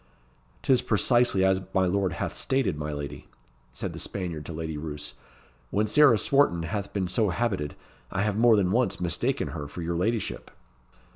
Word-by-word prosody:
"'T - - +4
is 125 - +3
precisely 120 -2 +3
as 95 0 +3
my 95 0 +4
lord 95 0 0
hath - - -3
stated, 130 - 0
my 75 +1 -4
lady," 75 -2 -6 0.4
said - - -5
the - - -7
Spaniard 85 -6 -4
to - - -5
Lady 80 -1 -4
Roos. 75 -1 -6 0.6
"When 105 +2 +1
Sarah 135 +1 +6
Swarton 120 -9 +2
hath 100 +4 -3
been 95 -3 -1
so 105 +3 +1
habited, 95 -7 -1 0.4
I 100 0 0
have 105 -1 0
more 115 +1 +5
than 95 -3 +2
once 120 +3 +1
mistaken 90 -1 -1
her 75 - -5
for 85 +4 -7
your 85 +1 -2
ladyship." 110 +5 -2
95 Hz, 180 wpm, -27 LUFS, 85-110 Hz, 0.6 s, Sarah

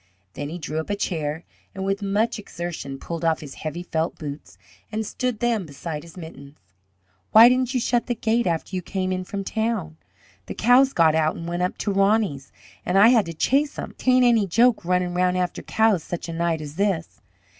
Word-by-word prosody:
Then 145 0 -5
he 170 - -5
drew 155 -1 -4
up 160 - -5
a 205 - 0
chair 160 -5 -3 0.3
and 190 0 -4
with 195 +1 -1
much 205 +3 0
exertion 170 -8 -6
pulled 165 +4 -6
off 165 -1 +1
his 145 -3 -9
heavy 155 +3 -4
felt 165 -1 -2
boots 145 - -8 0.3
and 220 0 -2
stood 250 +1 -3
them 230 -7 0
beside 150 +2 -6
his 170 +2 -14
mittens. 145 -4 -10 0.8
"Why 225 +2 +10
didn't 255 +1 0
you - - +3
shut 240 0 0
the 240 - -1
gate 230 0 +1
after 170 +2 -2
you 185 - -1
came 185 +1 -3
in 185 0 -2
from 195 +1 -4
town? 215 -7 -2 0.5
The - - -6
cows 255 +4 +4
got 160 -2 +4
out 155 -1 +1
and 165 - -7
went 175 +1 -2
up 180 - -1
to 205 - -2
Roney's 195 -8 +1 0.3
an' 180 - 0
I 205 +4 +8
had 230 -7 +4
to 165 - -5
chase 285 - +1
'em; - - -6
'tain't 255 -1 +3
any 230 -4 +4
joke 230 +4 +3
runnin' 180 0 0
round 180 0 +1
after 180 -1 -2
cows 220 -5 +2
such 175 - -5
a 165 - -5
night 165 -1 -1
as 150 +1 -8
this." 190 -5 -1
185 Hz, 210 wpm, -23 LUFS, 165-220 Hz, 0.8 s, Why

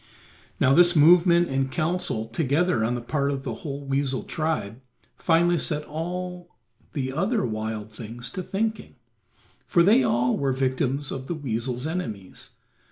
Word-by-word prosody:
Now 130 - +4
this 175 +3 +6
movement 170 +2 +6
and 135 0 -1
counsel 155 -9 -1
together 145 +2 +1
on 120 +2 0
the 120 - -4
part 140 +2 0
of 135 -1 -3
the 125 - -3
whole 140 -1 -6
weasel 135 -1 -1
tribe 155 -8 -3 0.3
finally 170 0 +2
set 150 -2 -1
all 175 +3 -6 0.4
the 130 -3 -2
other 200 - 0
wild 110 -1 -4
things 120 +3 -7
to 185 - -4
thinking, 215 +2 -3 0.7
for 170 - +4
they 220 +8 +5
all 125 - +2
were 135 -1 0
victims 135 +1 -1
of 130 0 -5
the 170 - -2
weasel's 125 -2 -3
enemies. 115 - -5
140 Hz, 150 wpm, -25 LUFS, 125-175 Hz, 0.7 s, this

